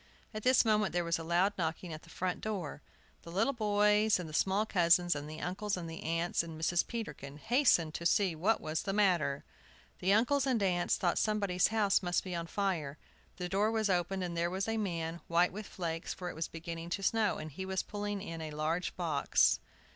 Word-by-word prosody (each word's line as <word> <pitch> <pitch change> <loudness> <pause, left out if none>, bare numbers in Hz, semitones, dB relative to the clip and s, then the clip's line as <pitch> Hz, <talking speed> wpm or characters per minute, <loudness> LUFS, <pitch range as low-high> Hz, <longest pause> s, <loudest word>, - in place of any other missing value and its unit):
At 215 - -4
this 250 +1 +4
moment 210 -6 +2
there 175 0 +1
was 170 0 0
a - - -5
loud 175 +5 +2
knocking 160 +1 -2
at 155 - -7
the - - -17
front 180 +2 -3
door. 190 -9 -4 0.4
The - - -11
little 225 +10 +1
boys, 210 -1 +3
and 175 - -5
the 155 - -10
small 195 +6 +2
cousins, 175 -3 +3
and 145 +1 -5
the 155 +1 -7
uncles 195 +2 -2
and 165 -2 -6
aunts, 165 +1 -1
and 165 -2 -8
Mrs. 170 +1 +1
Peterkin, 150 - -6
hastened 175 - +3
to 170 - -5
see 190 -1 +2
what 190 +8 +1
was 155 +1 -2
the 195 - -3
matter. 180 -9 +2 0.6
The 190 - +1
uncles 250 +6 +3
and 240 -6 +1
aunts 175 -2 +1
thought 175 - +1
somebody's 200 -4 +2
house 210 -3 +2
must 175 -1 0
be 185 - -5
on 170 -1 -3
fire. 165 -7 -2 0.4
The 180 - -3
door 200 +4 +1
was 220 -3 +1
opened, 185 +1 0
and 175 -1 -4
there 170 +1 0
was 190 +3 -2
a 225 - 0
man, 170 -5 -3
white 170 +2 +3
with 210 +1 -6
flakes, 165 -2 -4
for 180 -1 -5
it - - -12
was 160 +1 -2
beginning 165 0 -7
to 195 - -9
snow, 220 0 +2
and 155 - -7
he 190 +7 -6
was 190 0 -2
pulling 205 -1 -4
in 165 -4 -6
a 155 - -5
large 155 +4 -2
box. 165 -5 +2
180 Hz, 215 wpm, -32 LUFS, 165-205 Hz, 0.6 s, this